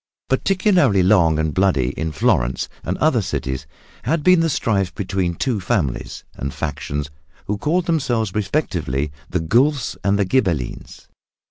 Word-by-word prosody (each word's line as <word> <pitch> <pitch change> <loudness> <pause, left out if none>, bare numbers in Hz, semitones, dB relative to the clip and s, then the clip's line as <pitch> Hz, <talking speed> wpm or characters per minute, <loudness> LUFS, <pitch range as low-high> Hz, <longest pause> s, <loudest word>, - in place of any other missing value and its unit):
Particularly 160 - +3
long 85 -5 +4
and 80 -1 0
bloody 90 -10 +2
in 80 +3 -3
Florence 65 -3 +1 0.2
and - - -2
other - - +2
cities 65 -1 -3 0.3
had 150 +5 0
been 180 +1 +6
the 165 0 +2
strife 100 - 0
between 95 -3 -1
two 120 +3 -1
families 90 - -2
and 70 +1 -4
factions 75 0 -4 0.3
who 105 0 -2
called 170 - +1
themselves 120 - 0
respectively 90 - -1 0.2
the 90 - 0
Guelfs 125 - +2
and 100 0 +2
the 100 - +2
Ghibellines. 90 - -2
95 Hz, 140 wpm, -21 LUFS, 80-130 Hz, 0.3 s, been